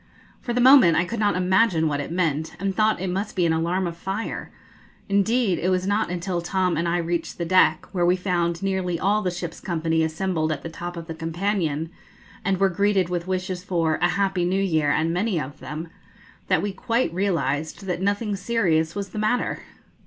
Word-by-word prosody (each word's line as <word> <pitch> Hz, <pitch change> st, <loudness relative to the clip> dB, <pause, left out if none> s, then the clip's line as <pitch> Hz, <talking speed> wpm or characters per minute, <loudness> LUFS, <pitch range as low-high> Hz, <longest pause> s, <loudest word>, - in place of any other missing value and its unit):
For 240 Hz, -, -4 dB
the 245 Hz, -, 0 dB
moment 245 Hz, -, +7 dB
I 170 Hz, -, +2 dB
could 230 Hz, +5 st, -4 dB
not 205 Hz, -1 st, +2 dB
imagine 185 Hz, -2 st, +3 dB
what 145 Hz, -1 st, -1 dB
it 145 Hz, -, -4 dB
meant, 160 Hz, -3 st, -1 dB
and 195 Hz, +1 st, -1 dB
thought 215 Hz, -2 st, +2 dB
it 190 Hz, -, -3 dB
must 195 Hz, +4 st, -3 dB
be 180 Hz, -3 st, +2 dB
an 165 Hz, -, +2 dB
alarm 170 Hz, +3 st, 0 dB
of 170 Hz, -1 st, -4 dB
fire; 195 Hz, +6 st, -4 dB, 0.6 s
indeed, 200 Hz, 0 st, +2 dB
it 180 Hz, -, 0 dB
was 185 Hz, 0 st, +1 dB
not 205 Hz, +1 st, +1 dB
until 175 Hz, 0 st, -2 dB
Tom 180 Hz, +1 st, 0 dB
and 170 Hz, +2 st, 0 dB
I 170 Hz, +1 st, +1 dB
reached 170 Hz, -1 st, -2 dB
the 170 Hz, -, -2 dB
deck, 165 Hz, -3 st, +3 dB
where 180 Hz, -3 st, 0 dB
we 175 Hz, +1 st, +4 dB
found 175 Hz, -2 st, -1 dB
nearly 185 Hz, -3 st, -1 dB
all 205 Hz, +2 st, +2 dB
the 185 Hz, -, 0 dB
ship's 175 Hz, -2 st, -6 dB
company 165 Hz, -2 st, 0 dB
assembled 160 Hz, 0 st, -1 dB
at 145 Hz, -2 st, -4 dB
the 165 Hz, -, -5 dB
top 175 Hz, +1 st, -7 dB
of 165 Hz, -, -6 dB
the 165 Hz, -, -6 dB
companion, 165 Hz, -1 st, -2 dB, 0.5 s
and 190 Hz, -2 st, 0 dB
were 195 Hz, -, +4 dB
greeted 195 Hz, -1 st, +1 dB
with 175 Hz, 0 st, -3 dB
wishes 185 Hz, -1 st, -3 dB
for 165 Hz, -4 st, 0 dB
'A 175 Hz, -, +4 dB
happy 190 Hz, -1 st, 0 dB
New 185 Hz, +2 st, +1 dB
Year, 160 Hz, -6 st, +1 dB
and 160 Hz, +2 st, +1 dB
many 185 Hz, 0 st, 0 dB
of 145 Hz, 0 st, -6 dB
them,' 155 Hz, +3 st, -6 dB, 0.6 s
that -, -, +2 dB
we 205 Hz, -, -1 dB
quite 230 Hz, +1 st, -1 dB
realised 170 Hz, -3 st, -1 dB
that 180 Hz, -1 st, -2 dB
nothing 205 Hz, +2 st, 0 dB
serious 180 Hz, -6 st, +1 dB
was 200 Hz, -1 st, -4 dB
the 210 Hz, -, -5 dB
matter. 215 Hz, +4 st, 0 dB
180 Hz, 205 wpm, -24 LUFS, 165-195 Hz, 0.6 s, moment